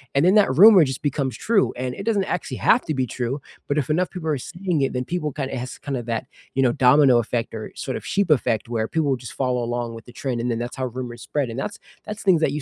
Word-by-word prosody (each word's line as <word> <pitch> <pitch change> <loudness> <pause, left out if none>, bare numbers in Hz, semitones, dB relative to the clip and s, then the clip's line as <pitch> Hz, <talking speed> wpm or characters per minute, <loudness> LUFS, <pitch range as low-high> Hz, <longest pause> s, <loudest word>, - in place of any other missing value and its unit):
and 140 - +4
then 185 +4 +5
that 205 -9 +5
rumor 195 +1 +9
just 130 -1 -4
becomes 140 -2 -1
true, 215 -3 +2
and 125 0 -3
it - - -6
doesn't 210 -4 +1
actually - - -3
have 240 - +3
to 155 - -1
be 130 -3 -1
true, 125 +4 -3 0.3
but 145 - -1
if 140 - -3
enough 175 +4 +1
people 170 -4 -4
are 150 - +1
seeing 175 +3 -2
it, 135 - 0
then 125 0 -1
people 170 -2 -2
kinda 135 -1 -4
s - - -2
it 120 - -3
has 125 - -7
kinda 135 -4 -4
that, 115 -1 -3 0.3
you 135 - +2
know, 125 - +4
domino 130 0 +5
effect 115 0 -2
or 110 - -6
sort 130 - -4
of - - -10
sheep 200 -2 0
effect 115 -6 +1
where 110 -2 -1
people 160 -3 0
will 135 - +2
just 120 0 -9
follow 125 -2 -1
along 120 -1 -3
with 115 - -11
the 120 - -14
trend, 125 -3 -3
and 120 +1 -1
then 115 - -2
that's 120 +1 -5
how 130 - -1
rumors 120 -1 -7
spread, 140 -5 -2
and 115 - -6
that's 205 - -5 0.3
that's 210 0 -6
things 185 -5 +4
that 155 - +2
you 150 - -3
135 Hz, 285 wpm, -23 LUFS, 120-160 Hz, 0.3 s, rumor